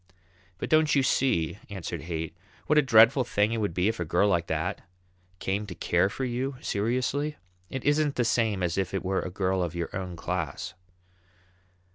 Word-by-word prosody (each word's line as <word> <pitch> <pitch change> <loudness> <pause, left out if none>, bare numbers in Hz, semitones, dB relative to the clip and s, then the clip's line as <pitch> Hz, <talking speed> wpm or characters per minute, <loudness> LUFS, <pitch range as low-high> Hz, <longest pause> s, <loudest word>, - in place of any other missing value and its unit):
"But - - -5
don't 155 -1 +4
you 140 - +4
see," 105 -9 +1
answered 95 -5 -5
Haight, 80 -1 -4 0.3
"what 150 - +4
a - - +6
dreadful 125 +1 +6
thing 105 -2 +1
it 115 - -1
would 100 -6 -1
be 90 +2 +2
if 110 -2 -1
a - - 0
girl 85 +5 +2
like 85 -4 +1
that - - -2 0.6
came 100 +3 -2
to 90 - -7
care 90 +2 +2
for 130 +5 -3
you 130 +2 -2
seriously? 130 +8 -1 0.3
It 135 - -5
isn't 145 0 +2
the 120 - +1
same 110 -5 +1
as 85 +2 0
if 95 0 -2
it 95 - -3
were 95 +1 +1
a - - -4
girl 95 0 0
of 85 -1 -2
your 85 -1 -4
own 90 -2 -4
class." 85 -3 -3
100 Hz, 190 wpm, -27 LUFS, 90-125 Hz, 0.6 s, a